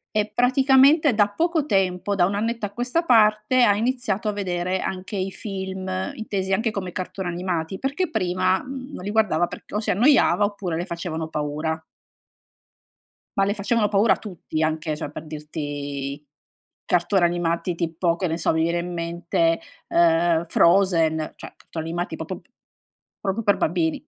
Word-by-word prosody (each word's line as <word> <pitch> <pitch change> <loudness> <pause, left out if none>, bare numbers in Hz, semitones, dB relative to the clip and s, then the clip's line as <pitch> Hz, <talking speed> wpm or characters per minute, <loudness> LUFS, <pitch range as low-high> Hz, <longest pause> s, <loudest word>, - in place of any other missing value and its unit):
e 210 0 0
praticamente 265 +3 +5
da 205 -1 +4
poco 320 +7 0
tempo, 190 - +1
da 175 - +4
1 200 - -2
annetto 225 +1 -1
a - - -9
questa 250 +10 -1
parte, 215 -1 +4
ha 205 -4 +5
iniziato 225 -3 -1
a 210 - +1
vedere 185 -2 -2
anche 190 +2 -5
i 190 0 -1
film, 190 -2 -5 0.3
intesi 195 -3 -3
anche 220 +2 +1
come 190 -3 -4
cartoni 185 +1 -4
animati, 175 0 -3
perché 285 +6 -1
prima, 185 - +1
mhmm, 260 0 -8
non 180 - -7
li 205 - -3
guardava 210 -6 +2
perc - - -11
o 210 - 0
si - - 0
annoiava 235 -1 +4
oppure 200 -5 -2
le 175 - -2
facevano 170 -2 -4
paura. 155 +1 -2 1.6
Ma 195 - +4
le 200 +1 0
facevano 210 +1 +1
paura 205 +2 +3
tutti, 175 -6 -5
anche 155 -1 -1
cioè 155 - -5
per 150 - -8
dirti, 145 -2 -5 0.6
cartoni 180 +2 +2
animati 170 0 0
tipo, 170 0 0
che 185 - -1
ne 165 -1 -1
so, 170 - +1
mi 160 0 +1
viene 170 +1 +1
in 175 +1 -4
mente, 170 -1 0 0.3
ehm, 170 0 +3
Frozen, 170 -3 +4 0.2
cioè - - -10
cartoni 160 -1 -7
animati 175 +2 -3
popo - - -6
p - - -33 0.7
proprio 205 +3 -2
per 205 -2 +4
bambini, 160 -1 0
185 Hz, 165 wpm, -23 LUFS, 170-210 Hz, 1.6 s, praticamente